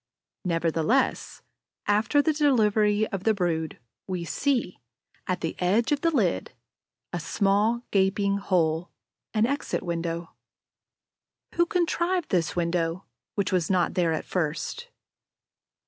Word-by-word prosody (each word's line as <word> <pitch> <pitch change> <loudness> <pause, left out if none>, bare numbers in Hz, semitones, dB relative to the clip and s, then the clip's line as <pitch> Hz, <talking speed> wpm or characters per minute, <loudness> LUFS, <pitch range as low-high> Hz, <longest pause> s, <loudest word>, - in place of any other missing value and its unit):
Nevertheless, 165 +8 0 0.4
after 220 +8 +3
the 315 - +2
delivery 215 -7 +3
of 195 -2 -4
the 220 0 +3
brood, 165 -4 -1 0.3
we 180 -3 -3
see, 245 - -1 0.5
at 185 -1 -1
the 165 - -2
edge 205 +8 +2
of 290 -1 +1
the 335 - +3
lid, 200 - 0 0.6
a 175 - -1
small, 205 +7 +1
gaping 200 0 +2
hole, 170 -4 +1 0.5
an 215 +1 +4
exit 280 +4 -2
window. 170 -1 -3 1.2
Who 345 0 +2
contrived 350 0 0
this 170 -4 0
window, 170 +1 -1 0.3
which 200 -3 0
was 180 -3 +1
not 180 -3 +2
there 175 -3 +2
at 160 - -2
first? 180 - -2
195 Hz, 120 wpm, -26 LUFS, 170-230 Hz, 1.2 s, an